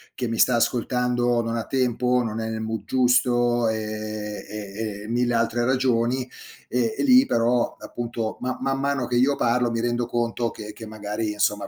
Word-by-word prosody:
che 125 - -2
mi 115 0 -2
sta 125 - +5
ascoltando 120 0 +1
non 115 0 -2
ha 115 - -2
tempo, 125 -1 +1
non 110 0 -3
è 110 - -3
nel 110 0 -3
mood 110 0 -3
giusto 120 -2 +3
e 110 -1 -4
e 105 0 -6
e - - -9
mille 120 +1 +1
altre 115 +1 +1
ragioni. 130 -1 +1 0.4
E 120 -1 0
e - - 0
lì 260 -1 +7
però, 120 - +1
appunto, 115 -2 -4
ma 130 0 -2
man 135 0 -1
mano 140 -2 0
che 125 - -1
io 135 +3 +3
parlo 120 0 +1
mi 115 - -1
rendo 120 0 0
conto 120 0 -1
che 105 0 -8
che 110 - -9
magari 105 0 -3
insomma 105 0 0
120 Hz, 185 wpm, -24 LUFS, 110-125 Hz, 0.4 s, lì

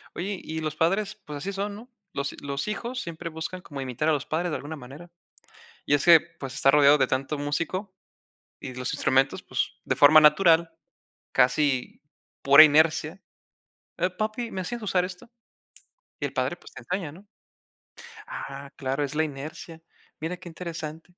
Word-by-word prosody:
Oye, 195 +1 -3
y 160 0 -5
los 155 -1 -3
padres, 195 +6 0
pues 150 -1 -6
así 190 +7 -4
son, 200 +1 -3
¿no? 230 +4 -12 0.2
Los 140 0 -4
los 140 -1 -3
hijos 240 +4 -4
siempre 170 0 -6
buscan 165 +3 -6
cómo 140 -5 -8
imitar 130 +3 -2
a - - +4
los 145 -2 -2
padres 170 +3 -1
de - - -1
alguna 150 +3 -7
manera, 145 +5 -11 0.8
y - - +2
es 145 - +2
que, 170 -2 +8
pues, 150 -6 -10
estar 135 0 +4
rodeado 145 0 +6
de 135 - +3
tanto 135 +3 -2
músico, 165 +7 -3 0.7
y 130 - -7
los 125 -1 -3
instrumentos, 135 +1 +1
pues, - - -2
de - - 0
forma 155 +2 +8
natural, 165 +1 +5 0.6
casi 130 0 +1 0.4
pura 140 +3 +9
inercia. 155 +3 +3 0.8
Eh, 185 - 0
"papi, 215 +5 -3
¿me 190 -3 -4
enseñas 240 +4 -5
a - - -5
usar 180 -2 +2
esto?". 180 +4 -9 0.9
Y - - -3
el - - -2
padre, - - -1
pues, - - -16
te - - -10
enseña, 180 -5 -4
¿no? 190 +5 -15 1.0
Ah, 140 0 -7
claro, 135 +1 -2
es 140 +1 -5
la 160 +1 +2
inercia. 155 +3 -8 0.4
Mira 165 +3 -3
qué 180 - -10
interesante. 165 -2 -7
155 Hz, 175 wpm, -26 LUFS, 145-180 Hz, 1.0 s, pura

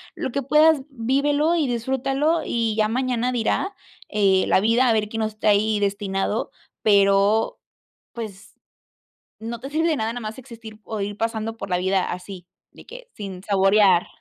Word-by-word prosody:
lo - - -4
que 280 - -1
puedas, 300 +2 +4
vívelo 280 +5 +1
y 315 -5 +1
disfrútalo 270 +6 0
y 230 -2 -1
ya 215 -1 +3
mañana 250 +1 -1
dirá, 245 - -1 0.3
eh, 195 -3 +2
la - - +4
vida 235 +4 +3
a - - +4
ver 210 -1 0
qué 225 - -6
nos 215 -1 -3
trae 215 0 +2
destinado, 200 +1 -1 0.3
pero, 200 - +3 0.5
pues, 215 -3 -9 0.9
no 230 +1 -5
te 270 +2 -7
sirve 320 +3 +1
de 315 - +1
nada 220 0 -2
nomás 220 -1 -6
existir 230 -4 -11
o 215 -2 -5
ir 200 +1 -4
pasando 225 0 -3
por - - -7
la 180 - +1
vida 190 +1 +1
así, 180 0 -8 0.3
de - - -16
que, - - -12
sin 190 -3 -8
saborear. 195 -2 +4
225 Hz, 165 wpm, -23 LUFS, 205-260 Hz, 0.9 s, puedas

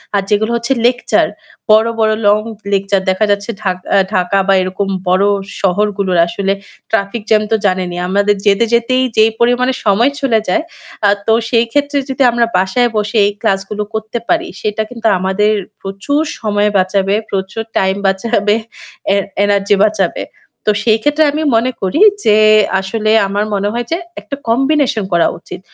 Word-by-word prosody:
আর 200 - +2
যেগুলো 220 +2 +1
হচ্ছে 235 +3 0
লেকচার 245 0 +2 0.4
বড়, 220 +1 +5
বড় 220 -1 +3 0.2
লং 205 +1 +4 0.3
লেকচার 195 0 +1
দেখা 190 +3 +1
যাচ্ছে 200 +2 -2
ঢা 190 - 0 0.4
ঢাকা 185 0 +1
বা 195 - +4
এরকম 190 +2 -2 0.2
বড় 185 +2 +3 0.4
শহরগুলোর 195 -1 0
আসলে 195 +3 -1 0.4
ট্রাফিক 215 +1 -1
জ্যাম 215 -1 +4
তো 225 - +4
জানেনি। 185 -2 0
আমাদের 200 +2 +2
যেতে 205 +3 +3
যেতেই 255 +2 +2
যেই 220 +1 +5
পরিমাণে 245 +2 +2
সময় 220 +6 +3
চলে 240 -5 +2
যায় 185 - +1 0.4
আ - - +5 0.2
তো 220 - +4 0.2
সেই 230 -1 +2
ক্ষেত্রে 285 +1 0
যদি 265 +1 -3
আমরা 235 0 +2
বাসায় 190 +7 +1
বসে 210 +2 -1
এই 205 - +1
ক্লাসগুলো 205 0 -1
করতে 220 +1 -4
পারি, 340 +1 +1
সেটা 215 0 -2
কিন্তু 230 -2 -3
আমাদের 195 +3 +1 0.3
প্রচুর 195 +10 -2 0.2
সময় 210 -1 0
বাঁচাবে, 195 +1 +1 0.2
প্রচুর 195 +3 -3
টাইম 190 0 +1
বাঁচাবে, 205 +1 +1 0.6
এ - - +2 0.3
এনার্জি 200 0 +2
বাঁচাবে। 205 -5 0 0.4
তো 215 - +4
সেই 220 -1 +3
ক্ষেত্রে 295 +1 +2
আমি 300 +2 -3
মনে 240 +3 +1
করি 190 -2 -1 0.3
যে 210 0 +5 0.4
আসলে 215 +3 -1 0.2
আমার 200 +2 -1
মনে 200 0 0
হয় 240 0 -3
যে 335 - +1 0.2
একটা 210 +7 -6
কম্বিনেশন 270 -2 +1
করা 170 -1 +3
উচিত। 180 - -10
210 Hz, 160 wpm, -14 LUFS, 195-235 Hz, 0.6 s, বড়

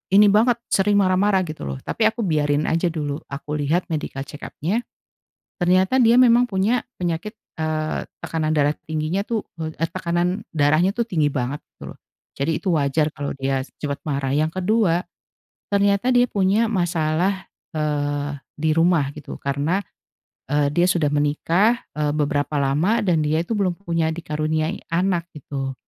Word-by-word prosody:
ini 205 +1 +8
banget 230 +4 +4 0.2
sering 205 +1 +3
marah-marah 190 0 +3
gitu 155 - -6
loh, 70 - -3
tapi 220 - +1
aku 225 +1 -2
biarin 150 -4 +1
aja 165 +2 +1
dulu, 150 -3 -3
aku 150 +2 -5
lihat 155 +5 +1
medical 150 -3 -3
check-up-nya, 155 - -3 0.8
ternyata 185 +6 +3
dia 235 -2 +5
memang 245 -1 +6
punya 215 +3 0
penyakit, 175 +4 -3 0.2
eee, 155 0 -2 0.2
tekanan 155 -1 -1
darah 145 0 +2
tingginya 160 +6 -2
tuh, 225 -3 -1 0.2
eee, 160 -1 -4 0.2
tekanan 180 +3 -1
darahnya 155 +6 +3
tuh 235 - +1
tinggi 175 -10 0
banget 130 +2 -2 0.2
gitu - - -9
loh. - - -14 0.4
Jadi 155 +3 -1
itu 190 - 0
wajar 150 +2 +1
kalau 145 -2 -5
dia 135 0 0 0.2
cepet 145 -2 -2
marah. 140 -2 -1
Yang 155 +6 0
ke-2, 185 -4 +2 0.7
ternyata 200 +3 +2
dia 245 -1 +5
punya 205 0 +2
masalah, 175 -1 0 0.3
eee, 145 -1 -1 0.2
di 155 +1 +1
rumah 165 -4 +2
gitu 150 -2 -8
karena, 145 +7 -1 0.7
eee, 145 -1 +2
dia 175 +3 +3
sudah 170 -5 +2
menikah, 165 +10 +2 0.2
eee, 150 -1 +1
beberapa 150 0 0
lama 150 +12 +2
dan 180 -5 +2
dia 155 +2 +1
itu 195 +7 -3
belum 190 -3 +1
punya 165 -4 -1
dikaruniai 155 -1 -2
anak 175 -1 +1
gitu, 135 -2 -5
165 Hz, 155 wpm, -22 LUFS, 150-195 Hz, 0.8 s, ini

